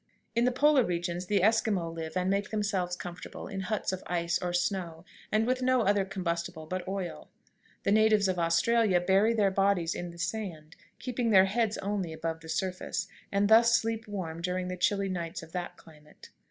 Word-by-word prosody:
In 235 Hz, +1 st, +3 dB
the 250 Hz, -, +3 dB
polar 280 Hz, +1 st, +4 dB
regions 175 Hz, -1 st, -2 dB
the 200 Hz, -2 st, +2 dB
Esquimaux 215 Hz, -6 st, +2 dB
live 165 Hz, +1 st, -5 dB
and 180 Hz, 0 st, 0 dB
make 200 Hz, +1 st, 0 dB
themselves 200 Hz, -4 st, -1 dB
comfortable 175 Hz, 0 st, -8 dB
in 195 Hz, -1 st, -5 dB
huts 190 Hz, 0 st, -2 dB
of 185 Hz, -, -4 dB
ice 170 Hz, -1 st, 0 dB
or 180 Hz, -1 st, -2 dB
snow, 175 Hz, -2 st, -2 dB, 0.3 s
and 215 Hz, +1 st, +2 dB
with 255 Hz, +1 st, 0 dB
no 255 Hz, -1 st, +3 dB
other 200 Hz, -1 st, +2 dB
combustible 170 Hz, -4 st, -3 dB
but 185 Hz, +3 st, -4 dB
oil. 190 Hz, -3 st, -5 dB, 0.5 s
The 200 Hz, -, +1 dB
natives 215 Hz, -1 st, +4 dB
of 185 Hz, -2 st, -1 dB
Australia 180 Hz, +4 st, +3 dB
bury 195 Hz, +5 st, +3 dB
their 205 Hz, -3 st, +3 dB
bodies 190 Hz, -3 st, +2 dB
in 175 Hz, -, -5 dB
the 170 Hz, -, -12 dB
sand, 170 Hz, -4 st, -4 dB, 0.2 s
keeping 245 Hz, -2 st, -2 dB
their 190 Hz, -3 st, +7 dB
heads 220 Hz, +2 st, 0 dB
only 195 Hz, -4 st, -2 dB
above 160 Hz, 0 st, -4 dB
the 160 Hz, 0 st, -12 dB
surface, 185 Hz, +1 st, -2 dB, 0.2 s
and 200 Hz, +1 st, +2 dB
thus 230 Hz, +2 st, +6 dB
sleep 225 Hz, 0 st, -1 dB
warm 170 Hz, -5 st, -5 dB
during 180 Hz, +1 st, -2 dB
the 180 Hz, -, -3 dB
chilly 195 Hz, +2 st, +1 dB
nights 170 Hz, -3 st, -4 dB
of 160 Hz, -, -13 dB
that 180 Hz, 0 st, -5 dB
climate. 150 Hz, -2 st, -17 dB
190 Hz, 190 wpm, -29 LUFS, 175-215 Hz, 0.5 s, their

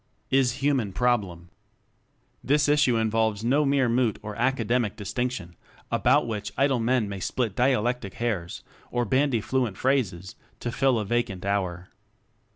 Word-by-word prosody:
Is 130 Hz, -3 st, +3 dB
Human 130 Hz, -9 st, +1 dB
Problem. 100 Hz, -9 st, 0 dB, 0.9 s
This 145 Hz, +2 st, +2 dB
issue 145 Hz, -4 st, +3 dB
involves 110 Hz, -1 st, 0 dB
no 140 Hz, +5 st, +2 dB
mere 135 Hz, -2 st, +2 dB
moot 120 Hz, -1 st, +1 dB
or 105 Hz, -1 st, -6 dB
academic 120 Hz, -2 st, 0 dB
distinction, 105 Hz, -4 st, -4 dB, 0.4 s
about 135 Hz, +3 st, +3 dB
which 105 Hz, -3 st, -4 dB
idle 135 Hz, -1 st, +2 dB
men 115 Hz, -1 st, +1 dB
may 100 Hz, -1 st, -5 dB
split 110 Hz, +2 st, -2 dB
dialectic 125 Hz, -4 st, 0 dB
hairs 100 Hz, -8 st, -3 dB, 0.3 s
or 120 Hz, -1 st, -1 dB
bandy 130 Hz, 0 st, +1 dB
fluent 125 Hz, -5 st, -1 dB
phrases 100 Hz, -10 st, 0 dB, 0.3 s
to 120 Hz, -, -3 dB
fill 130 Hz, 0 st, +2 dB
a 105 Hz, -, -2 dB
vacant 110 Hz, -4 st, -2 dB
hour. 90 Hz, -3 st, -2 dB
120 Hz, 140 wpm, -26 LUFS, 100-130 Hz, 0.9 s, Is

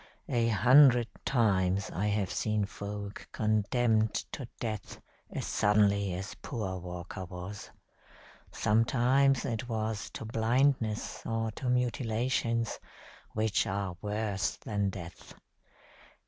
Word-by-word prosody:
A 115 Hz, -1 st, +2 dB
hundred 125 Hz, +2 st, +6 dB, 0.2 s
times 100 Hz, -6 st, +2 dB
I 100 Hz, +5 st, 0 dB
have 100 Hz, -2 st, 0 dB
seen 105 Hz, -2 st, 0 dB
folk 100 Hz, 0 st, -7 dB
condemned 110 Hz, +1 st, +2 dB, 0.2 s
to 135 Hz, -, -5 dB
death 110 Hz, -3 st, -4 dB, 0.3 s
as -, -, -4 dB
suddenly 100 Hz, -2 st, +2 dB
as 95 Hz, +2 st, -5 dB
poor 95 Hz, -7 st, -3 dB
Walker 90 Hz, +1 st, -6 dB
was. 90 Hz, +3 st, -8 dB, 0.8 s
Sometimes 125 Hz, +5 st, +3 dB
it 120 Hz, +2 st, -3 dB
was 110 Hz, -1 st, -2 dB
to -, -, -5 dB
blindness 115 Hz, 0 st, +1 dB
or 115 Hz, 0 st, -1 dB
to 125 Hz, +4 st, -4 dB
mutilations 120 Hz, -2 st, 0 dB, 0.5 s
which 110 Hz, +1 st, +1 dB
are 95 Hz, -3 st, -2 dB
worse 105 Hz, -1 st, -1 dB
than 100 Hz, -2 st, -1 dB
death. 90 Hz, -3 st, -9 dB
110 Hz, 105 wpm, -30 LUFS, 100-115 Hz, 0.8 s, hundred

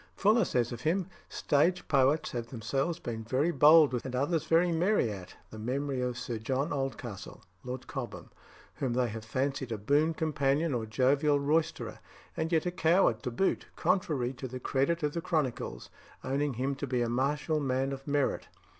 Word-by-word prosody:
Fuller 215 Hz, +1 st, +4 dB
says 120 Hz, -6 st, 0 dB
of 120 Hz, -1 st, -6 dB
him: 175 Hz, +6 st, +1 dB, 0.2 s
"Stage 170 Hz, +5 st, +1 dB
poets 140 Hz, +2 st, +2 dB
have 120 Hz, -1 st, -4 dB
themselves 135 Hz, +8 st, -2 dB
been 115 Hz, -2 st, -5 dB
very 130 Hz, +9 st, +1 dB
bold 150 Hz, -1 st, +6 dB
with, 120 Hz, -, -1 dB
and 130 Hz, -1 st, -5 dB
others 155 Hz, +4 st, 0 dB
very 170 Hz, +2 st, +4 dB
merry 170 Hz, -, +2 dB
at, 95 Hz, -3 st, -9 dB, 0.2 s
the 110 Hz, -, -8 dB
memory 130 Hz, +3 st, -2 dB
of 125 Hz, -1 st, -2 dB
Sir 120 Hz, -2 st, -4 dB
John 135 Hz, +7 st, -1 dB
Oldcastle 130 Hz, -7 st, -5 dB, 0.2 s
(Lord 125 Hz, 0 st, -6 dB
Cobham), 135 Hz, -4 st, -6 dB, 0.5 s
whom 130 Hz, -3 st, -1 dB
they 125 Hz, -1 st, +1 dB
have 110 Hz, 0 st, -6 dB
fancied 130 Hz, +2 st, -2 dB
a 110 Hz, -, -1 dB
boon 145 Hz, +9 st, +2 dB
companion 150 Hz, 0 st, +1 dB
or 115 Hz, -3 st, -2 dB
jovial 140 Hz, +6 st, +2 dB
roysterer, 155 Hz, +3 st, -1 dB, 0.4 s
and 160 Hz, +1 st, -2 dB
yet 160 Hz, -1 st, +2 dB
a 180 Hz, -, 0 dB
coward 165 Hz, -, +3 dB
to 125 Hz, -, -3 dB
boot, 155 Hz, +11 st, 0 dB
contrary 140 Hz, -9 st, 0 dB
to 130 Hz, +1 st, -6 dB
the 130 Hz, +1 st, -6 dB
credit 140 Hz, +6 st, 0 dB
of 150 Hz, 0 st, 0 dB
the 170 Hz, -, -2 dB
chronicles, 150 Hz, -, -2 dB, 0.3 s
owning 140 Hz, 0 st, -1 dB
him 135 Hz, +4 st, -1 dB
to 140 Hz, -, -4 dB
be 125 Hz, -2 st, 0 dB
a -, -, -1 dB
martial 145 Hz, +6 st, 0 dB
man 135 Hz, -1 st, 0 dB
of 135 Hz, +1 st, -7 dB
merit. 145 Hz, -1 st, 0 dB
135 Hz, 180 wpm, -30 LUFS, 125-155 Hz, 0.5 s, bold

